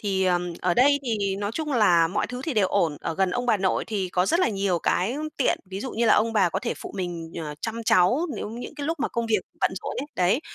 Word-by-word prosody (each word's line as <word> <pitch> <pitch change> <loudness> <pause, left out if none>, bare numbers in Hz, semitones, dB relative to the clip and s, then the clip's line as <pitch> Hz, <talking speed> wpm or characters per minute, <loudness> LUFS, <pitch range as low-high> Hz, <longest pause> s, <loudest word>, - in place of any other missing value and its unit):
Thì, 190 -2 0
ờm, 180 -1 +1
ở 180 -1 +1
đây 285 +3 +5
thì 200 -5 -1
nói 205 0 -2
chung 305 -3 -2
là 175 -8 +4
mọi 205 +5 -1
thứ 250 +1 -6
thì 300 -1 -3
đều 205 -3 +3
ổn. 165 -7 +1
Ở 165 - -3
gần 190 0 +1
ông 245 +5 -2
bà 220 - +4
nội 190 -1 0
thì 200 -4 -2
có 180 +1 +1
rất 335 - +2
là - - +3
nhiều 195 -4 0
cái 205 - 0 0.2
tiện. 270 - +2
Ví 190 - -5
dụ 260 - -4
như 235 +1 0
là - - +6
ông 225 +2 +2
bà 195 -5 +3
có - - -2
thể 235 - -3
phụ - - -9
mình, 170 -3 -4
ờ, 150 -2 -5
chăm 230 0 -4
cháu 240 - +4
nếu - - -4
những 235 +6 -7
cái 290 -1 -5
lúc 325 -3 -2
mà - - +1
công 235 -1 -2
việc 220 -2 +2 0.2
bận - - +3
rộn - - -4
ấy, 285 - -5
đấy. 185 +8 +2
205 Hz, 280 wpm, -25 LUFS, 180-245 Hz, 0.2 s, là